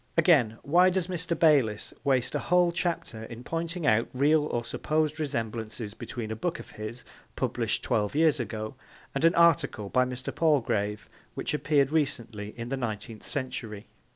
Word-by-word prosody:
Again, 145 -10 +4
why 180 +5 +5
does 185 -1 0
Mr. 175 -2 -2
Bayliss 135 -11 +3
waste 130 -3 +1
a - - 0
whole 180 0 +3
chapter 170 -10 -3
in 115 +1 -9
pointing 165 +3 -3
out 115 -3 +3
real 150 +3 +3
or 120 -4 -2
supposed 155 +5 -1
resemblances 115 -6 -3
between 110 -1 -6
a - - -2
book 170 +10 -2
of - - -11
his 110 +3 -7 0.3
published - - -1
twelve 105 +3 0
years 155 -2 +4
ago 110 -2 -4 0.4
and 140 - -2
an 165 +1 +5
article 165 -11 +3
by 125 +4 +3
Mr. 125 0 -5
Palgrave 110 -9 +1 0.3
which - - -3
appeared 145 -2 +2
recently 115 -9 -2
in 120 0 -5
the 135 - -1
Nineteenth 110 -2 -5
Century? 120 -5 -4
130 Hz, 160 wpm, -28 LUFS, 110-160 Hz, 0.4 s, why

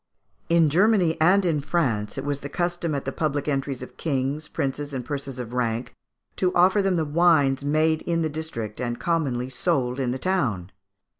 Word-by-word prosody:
In 165 -3 +4
Germany 185 -1 +3
and 185 +4 +5
in 155 -4 +1
France 125 -10 -1
it 135 - -4
was 145 -1 -1
the 140 - -7
custom 175 -1 -1
at 140 - -3
the 135 - -2
public 145 -1 -2
entries 135 -2 -2
of - - -12
kings, 145 0 -2
princes, 145 0 -3
and 125 -2 -4
persons 140 -2 -5
of 120 -1 -6
rank, 120 0 -1 0.4
to 180 -1 +2
offer 185 +4 +5
them 195 -1 +1
the 160 -2 0
wines 145 -4 +3
made 155 +2 +2
in 165 -1 -1
the - - +1
district 145 -9 -5
and 120 -1 -3
commonly 140 -8 0
sold 130 -1 -1
in 130 -2 0
the 125 - -1
town. 125 - -1
145 Hz, 190 wpm, -24 LUFS, 130-170 Hz, 0.4 s, and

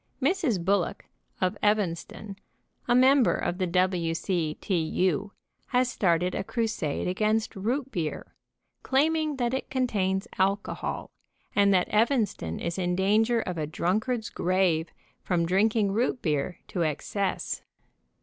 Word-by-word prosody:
Mrs. 270 - +1
Bullock 195 -2 0 0.4
of 185 -1 +1
Evanston, 205 0 -1 0.5
a 240 - +4
member 260 0 +5
of 180 - -2
the 185 - +1
W. 175 -2 +1
C. 165 -4 -1
T. 195 - -1
U., 185 +5 0 0.4
has 250 -1 +2
started 180 -1 +1
a - - -2
crusade 215 - -2
against 215 +4 0
root 250 +7 -2
beer, 165 -8 -4 0.5
claiming 310 +2 +1
that 245 -2 -1
it 265 - -3
contains 195 -7 0
alcohol, 195 +2 -1 0.4
and 200 0 +5
that 180 - +2
Evanston 215 - +1
is 170 +2 -3
in 180 -1 0
danger 220 +5 +3
of 180 -5 -4
a 150 - -2
drunkard's 220 - -1
grave 175 -3 +1 0.3
from 170 -2 0
drinking 200 +3 +2
root 240 +4 0
beer 155 +2 -1
to 175 - -1
ex 155 -2 -2
cess. 200 -2 -2
195 Hz, 135 wpm, -27 LUFS, 180-230 Hz, 0.5 s, member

